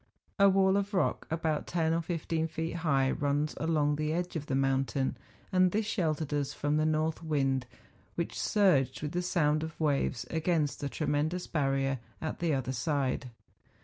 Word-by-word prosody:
A 200 0 +7
wall 190 0 +4
of 200 +1 -2
rock, 185 - 0
about 160 -2 -1
ten 165 -2 +1
or 165 - +1
fifteen 165 -1 -2
feet 165 +1 -4
high, 135 -5 +2
runs 145 +1 0
along 150 -2 +1
the 155 +1 -1
edge 175 +1 -2
of 150 -2 -4
the 135 - 0
mountain, 135 0 +1 0.4
and 185 0 +4
this 215 +2 0
sheltered 160 -8 -1
us 145 -1 -1
from 145 +1 0
the 155 0 +2
north 155 +1 0
wind, 135 -5 0 0.5
which, - - -3
surged 180 -11 +2
with 150 - -2
the 175 +1 -1
sound 155 -4 +1
of 160 0 -6
waves 140 -5 0
against 160 -2 0
the 140 - -3
tremendous 155 +5 -1
barrier 135 -3 0 0.2
at 160 - -4
the 170 -2 +1
other 130 -2 -1
side. 135 -1 -1
155 Hz, 175 wpm, -30 LUFS, 140-165 Hz, 0.5 s, A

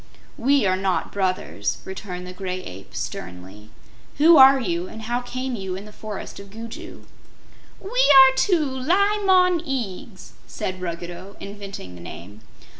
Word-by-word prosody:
"We 275 -1 +3
are 185 -1 +3
not 190 -1 -1
brothers," 185 - -1
returned 185 -1 -7
the 180 - -8
Gray 185 -1 -5
Ape, 95 +2 -11
sternly. 95 +4 -7 0.5
"Who 325 +4 +7
are 270 0 +8
you, 175 -6 -2
and 220 +3 -9
how 240 +2 -1
came 255 +1 -4
you 190 -3 -4
in 195 +2 -8
the 210 - -13
forest 210 -2 -7
of 200 0 -11
Gugu?" 225 +2 -9 0.7
"We 390 - -10
are 275 - +7
two 345 -1 +2
Li 370 +11 +1
Mon 365 -2 +4
Eags," 235 - -5 0.2
said 185 0 -5
Ruggedo, 175 +2 -6
inventing 200 - -8
the 90 - -12
name. 100 +5 -10
200 Hz, 150 wpm, -23 LUFS, 180-265 Hz, 0.7 s, are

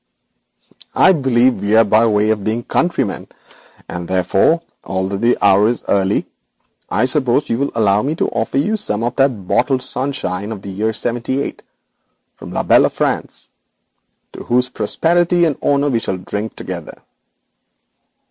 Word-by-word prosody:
'I - - +6
believe 130 - +2
we 100 +2 +1
are 115 - +7
by 110 +2 +3
way 105 0 +2
of 105 -2 -2
being 110 +3 -2
countrymen, 135 - -1 0.6
and, 85 0 -6
therefore, 95 - +2 0.2
although 95 +1 -2
the 120 +4 +2
hour 100 +1 +5
is 120 +1 -2
early, 100 0 +1 0.6
I - - +1
hope 130 +1 +1
you 115 - 0
will 140 - -1
allow 105 -2 +2
me 145 +6 -2
to - - 0
offer - - -2
you 210 +11 +1
some 110 - -1
of 120 +2 -2
this 135 0 +4
bottled 125 +4 -1
sunshine 115 -7 -3
of 100 -3 -7
the 100 - -6
year 105 +4 -1
'78 120 +4 -3 0.7
from - - -11
la - - -2
belle - - +4
France, - - -3 0.8
to - - -9
whose 125 +1 +1
prosperity 175 +1 +1
and 155 -4 0
honour 145 0 +1
we 115 - +1
shall 95 - -3
drink 105 +4 -5
together. - - -7
115 Hz, 155 wpm, -17 LUFS, 100-135 Hz, 0.8 s, are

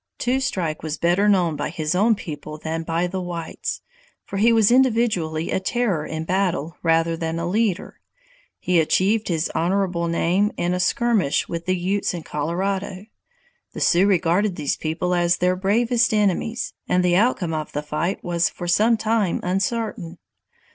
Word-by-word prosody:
Two 255 +2 0
Strike 180 - -2
was 155 0 -4
better 180 +6 +2
known 180 -6 +2
by - - -3
his 155 -1 -2
own 215 +5 +3
people 155 -4 -7
than 160 +1 -4
by 165 +1 -1
the 185 +1 -3
whites, 175 -2 -5 0.4
for 195 - -5
he 225 +4 +4
was 225 -1 +4
individually 225 -11 +2
a - - +1
terror 190 -6 -1
in 160 0 -4
battle 175 -3 -1
rather 165 0 +2
than 165 0 -3
a 170 - -2
leader. 200 0 -1 0.6
He 180 -2 +1
achieved 200 +7 +2
his 165 -2 -1
honorable 180 0 0
name 180 +5 +1
in 175 +1 0
a 180 - -1
skirmish 205 -3 +1
with 170 0 -5
the 185 0 +1
Utes 185 +1 -1
in 170 - -6
Colorado. 185 +6 -3 0.7
The - - -6
Sioux 180 +3 +4
regarded 185 +1 +2
these 145 - -1
people 165 +3 -2
as 175 0 +2
their 180 +1 +1
bravest 225 +4 +2
enemies, 210 +3 0 0.2
and 180 0 +2
the 175 -1 +3
outcome 190 -5 +1
of 155 -1 -4
the 150 - -3
fight 155 +5 -2
was 170 -1 +1
for 175 - -7
some 220 +6 +3
time 215 -4 0
uncertain. 195 -1 -2
180 Hz, 170 wpm, -22 LUFS, 165-205 Hz, 0.7 s, he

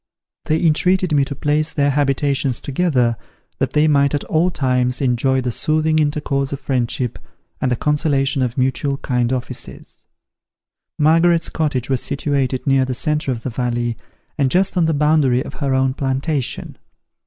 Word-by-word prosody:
They 155 +1 +1
entreated 180 +3 +2
me 140 -1 +4
to 140 - -5
place 150 +3 0
their 145 -1 +1
habitations 140 -2 0
together, 130 -6 0 0.4
that - - -1
they 150 +1 +3
might 140 -1 +3
at 145 - -2
all 165 +3 +1
times 125 -5 0
enjoy 130 0 +1
the 125 -1 -2
soothing 155 +4 +1
intercourse 145 -2 -1
of 140 - -4
friendship, 125 -3 -2 0.4
and 130 - 0
the - - +2
consolation 140 -1 0
of 125 -2 -2
mutual 135 +2 0
kind 125 -4 -1
offices. 130 -2 -6 0.9
Margaret's 165 +2 +3
cottage 145 -6 -1
was 130 -3 0
situated 140 -2 -1
near 135 -2 +3
the 130 -1 -3
centre 150 0 -1
of 115 -2 -5
the 130 - -3
valley, 120 -1 -2 0.4
and 135 -2 +3
just 190 +6 +1
on 175 -2 +3
the 160 -1 +1
boundary 145 -4 +2
of - - -8
her 135 -2 +1
own 130 0 +1
plantation. 135 +1 -2
140 Hz, 160 wpm, -19 LUFS, 130-150 Hz, 0.9 s, me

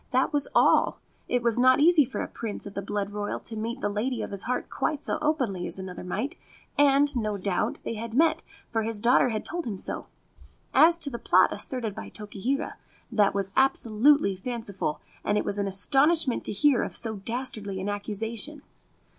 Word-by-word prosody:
That 260 +3 +1
was 290 -1 +1
all. - - +4 0.3
It 245 -1 0
was 235 0 +2
not 255 +1 +5
easy 315 -1 +6
for - - -5
a - - -5
Prince 225 -3 -5
of 200 - -8
the 200 - -3
blood 200 0 -3
royal 205 0 -3
to 225 - -8
meet 230 +4 -4
the - - +1
lady 225 +5 -2
of - - -6
his 200 -1 -4
heart 250 +1 -2
quite 300 -2 -2
so - - -1
openly 255 - 0
as - - -6
another 185 -2 -7
might; 210 +10 -3 0.4
and, 285 0 +4
no 215 -4 -1
doubt, 190 -1 -1
they - - -3
had 225 +1 -6
met, 320 +3 +3 0.3
for 225 - 0
his 220 -1 -2
daughter 245 +3 +4
had 215 -2 -3
told 345 0 -4
him 205 -4 -3
so. - - -5 0.7
As 335 +2 +6
to 310 -4 -2
the 235 - -5
plot - - +4
asserted 235 -5 -2
by - - -8
Tokihira, 220 +7 -3 0.3
that 205 -2 +3
was 195 -1 -1
absolutely 265 -3 +3
fanciful, 200 -6 -4 0.2
and 205 - +1
it - - 0
was 205 0 -2
an 200 - 0
astonishment 270 - +3
to - - -1
hear 255 +4 +3
of - - -4
so 220 -2 -1
dastardly 215 -2 -4
an 190 - -4
accusation. 225 +8 -2
230 Hz, 195 wpm, -27 LUFS, 205-270 Hz, 0.7 s, easy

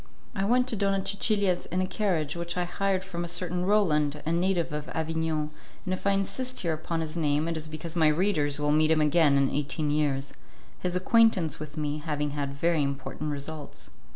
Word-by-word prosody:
I 195 -1 -1
went 250 +4 +3
to 230 - +1
Donna 195 -1 0
Cecilia's 200 -2 +1
in 180 - -2
a 185 - +2
carriage 180 -7 -1
which 170 +1 -4
I 180 - +1
hired 190 +1 -1
from 175 -3 -5
a - - -4
certain 175 +1 -1
Roland, 150 -8 +2
a 160 - 0
native 170 -1 +1
of 150 0 -4
Avignon, 160 -1 -1 0.3
and 185 - -1
if 185 - -3
I - - +5
insist 250 +7 -2
here 170 -3 0
upon 165 +1 -3
his 155 0 -4
name 150 -1 +1
it 165 - -2
is 155 -1 -4
because 155 +2 -6
my 160 -2 +4
readers 150 -3 +2
will 150 0 +1
meet 155 +1 +4
him 160 -1 +4
again 150 -1 +4
in 140 -1 +2
eighteen 145 +1 -1
years, 140 -2 0 0.5
his 180 -1 -2
acquaintance 185 - +3
with 155 +1 -8
me 150 0 -2
having 150 -1 -2
had 140 -1 -3
very 165 +1 +1
important 140 +2 -3
results. 145 - -6
160 Hz, 205 wpm, -28 LUFS, 150-185 Hz, 0.5 s, I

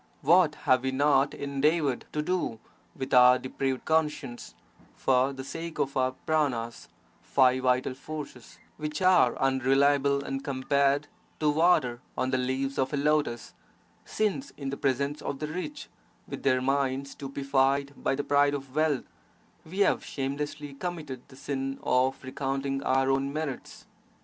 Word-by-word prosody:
What 165 +1 +5
have 130 -1 +4
we 130 - -1
not 140 +1 +2
endeavoured 140 0 0
to 150 - -1
do, 175 -9 -1 0.4
with 135 0 -5
our 125 0 +8
depraved 130 0 -3
conscience, 150 -6 -1 0.4
for 130 +1 +2
the 135 -1 -7
sake 165 +4 -6
of 135 - -1
our 130 0 +1
pranas 125 -7 -1 0.3
(five 130 -1 +3
vital 130 0 +1
forces) 140 -3 -9 0.2
which 150 0 -4
are 180 -10 +5
unreliable 140 +1 +2
and 135 0 -4
compared 140 +1 +1 0.3
to 150 -1 +3
water 145 -7 +2 0.2
on 130 0 0
the 130 - +1
leaves 130 +2 -2
of 130 0 +1
a - - +1
lotus, 145 -5 0 0.5
since 215 +6 -1
in 140 -2 -4
the - - -2
presence 140 +2 -1
of 140 - -4
the 150 - -3
rich, 185 - -5 0.4
with - - -6
their 130 -2 +2
minds 135 0 0
stupefied 140 0 0
by - - -1
the 145 - -2
pride 145 0 +3
of 135 -2 -8
wealth, 155 -4 +1 0.6
we 185 +5 -4
have - - +3
shamelessly 145 +1 -4
committed 155 -5 -5
the 130 - -15
sin 135 0 -3
of 130 +2 +1
recounting 135 +1 -2
our 135 0 +2
own 135 +1 0
merits! 150 -3 -5
140 Hz, 150 wpm, -28 LUFS, 130-150 Hz, 0.6 s, our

